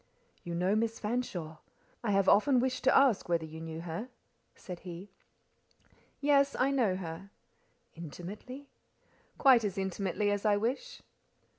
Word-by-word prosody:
"You 170 Hz, -1 st, -5 dB
know 185 Hz, +4 st, +1 dB
Miss 225 Hz, +1 st, 0 dB
Fanshawe? 200 Hz, -9 st, -3 dB, 0.5 s
I 225 Hz, -, -1 dB
have 195 Hz, -1 st, +2 dB
often 255 Hz, +5 st, +5 dB
wished 255 Hz, +1 st, -1 dB
to 265 Hz, -, +6 dB
ask 265 Hz, -10 st, +3 dB
whether 170 Hz, -2 st, +1 dB
you 160 Hz, +1 st, -9 dB
knew 160 Hz, 0 st, -6 dB
her," 175 Hz, +9 st, -5 dB, 0.5 s
said 180 Hz, -2 st, -8 dB
he. 180 Hz, +2 st, -9 dB, 1.1 s
"Yes: 280 Hz, -1 st, +3 dB
I 265 Hz, +2 st, +2 dB
know 235 Hz, -9 st, +2 dB
her." 185 Hz, +1 st, -7 dB, 0.6 s
"Intimately?" 195 Hz, -, -9 dB, 0.7 s
"Quite 260 Hz, -5 st, +6 dB
as 200 Hz, -1 st, -2 dB
intimately 195 Hz, +1 st, -1 dB
as 205 Hz, -1 st, -1 dB
I 210 Hz, -2 st, +3 dB
wish." 260 Hz, -, -3 dB
205 Hz, 140 wpm, -31 LUFS, 175-250 Hz, 1.1 s, to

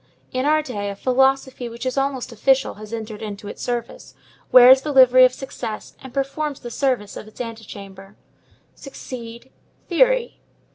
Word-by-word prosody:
In 255 Hz, +2 st, -1 dB
our 310 Hz, 0 st, +3 dB
day, 205 Hz, -7 st, -4 dB
a 200 Hz, -, -5 dB
philosophy 265 Hz, +1 st, +1 dB
which 235 Hz, +2 st, -8 dB
is 255 Hz, -, -2 dB
almost 270 Hz, -2 st, -2 dB
official 265 Hz, +4 st, +1 dB
has 215 Hz, +1 st, -12 dB
entered 220 Hz, -2 st, -6 dB
into 205 Hz, -1 st, -7 dB
its -, -, -8 dB
service, 240 Hz, -1 st, -5 dB, 0.4 s
wears 255 Hz, +1 st, +8 dB
the 300 Hz, -, -4 dB
livery 255 Hz, -1 st, +7 dB
of 255 Hz, -, +3 dB
success, 245 Hz, -4 st, -7 dB
and 265 Hz, -, -10 dB
performs 275 Hz, +2 st, -3 dB
the 240 Hz, -, -8 dB
service 250 Hz, -6 st, -1 dB
of -, -, -9 dB
its 215 Hz, -, -16 dB
antechamber. 200 Hz, -4 st, -9 dB, 0.6 s
Succeed: 245 Hz, -3 st, -10 dB, 0.4 s
theory. -, -, +2 dB
255 Hz, 155 wpm, -21 LUFS, 220-270 Hz, 0.6 s, wears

